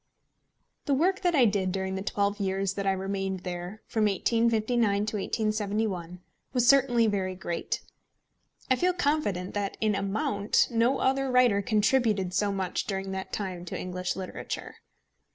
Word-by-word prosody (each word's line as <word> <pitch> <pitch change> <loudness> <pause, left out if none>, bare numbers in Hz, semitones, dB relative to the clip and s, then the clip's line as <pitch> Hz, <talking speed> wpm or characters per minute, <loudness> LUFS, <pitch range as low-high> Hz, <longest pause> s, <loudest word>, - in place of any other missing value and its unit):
The 280 - +2
work 375 +7 +1
I 295 -8 +5
did 200 -3 +1
during 190 0 -2
the 190 - -3
twelve 200 +1 -1
years 195 -1 0
that 195 0 -3
I - - +4
remained 195 0 -2
there, 180 +3 -6
from 220 -1 0
1859 220 0 +2
to 215 0 -2
1871, 205 -4 -2 0.3
was 245 -2 +2
certainly 260 -4 +5
very 190 -3 -1
great. 175 -2 -3 0.9
I 260 - +3
feel 360 +4 +2
confident 285 - 0
that 200 -1 -2
in 215 -1 +2
amount 200 +1 +1
no 235 +3 +2
other 270 0 +1
writer 250 -5 +4
contributed 215 -3 +2
so 205 +2 +1
much 190 -2 -2
during 195 -1 -3
that 190 0 -5
time 185 -4 -4
to - - -5
English 180 0 -3
literature. 190 -1 -6
205 Hz, 150 wpm, -28 LUFS, 190-235 Hz, 0.9 s, I